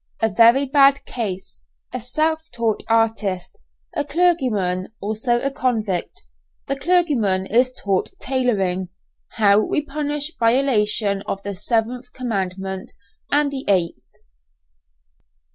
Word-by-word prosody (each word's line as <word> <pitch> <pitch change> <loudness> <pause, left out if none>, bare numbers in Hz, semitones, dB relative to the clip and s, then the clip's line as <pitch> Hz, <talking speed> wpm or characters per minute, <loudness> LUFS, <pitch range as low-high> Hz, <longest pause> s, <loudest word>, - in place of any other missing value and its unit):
A 225 - +2
VERY 235 +6 +6
BAD 275 0 +4
CASE 190 - -5 0.3
A 255 - -2
SELF 315 +7 -1
TAUGHT 230 -2 0
ARTIST 225 -5 0 0.3
A - - -1
CLERGYMAN 255 - +1
ALSO 220 +4 0
A 275 - 0
CONVICT 225 - -2 0.4
THE 275 - -1
CLERGYMAN 275 - +2
IS 250 +5 +2
TAUGHT 195 -6 -1
TAILORING 195 -9 0 0.4
HOW 210 -1 +4
WE 300 +6 -1
PUNISH 295 +1 -3
VIOLATION 225 -5 +2
OF 195 - -4
THE 200 - -4
SEVENTH 235 +5 -2
COMMANDMENT 190 -5 -4 0.4
AND 290 0 +2
THE 270 -1 -4
EIGHTH. 180 -4 0
230 Hz, 110 wpm, -21 LUFS, 200-275 Hz, 0.4 s, VERY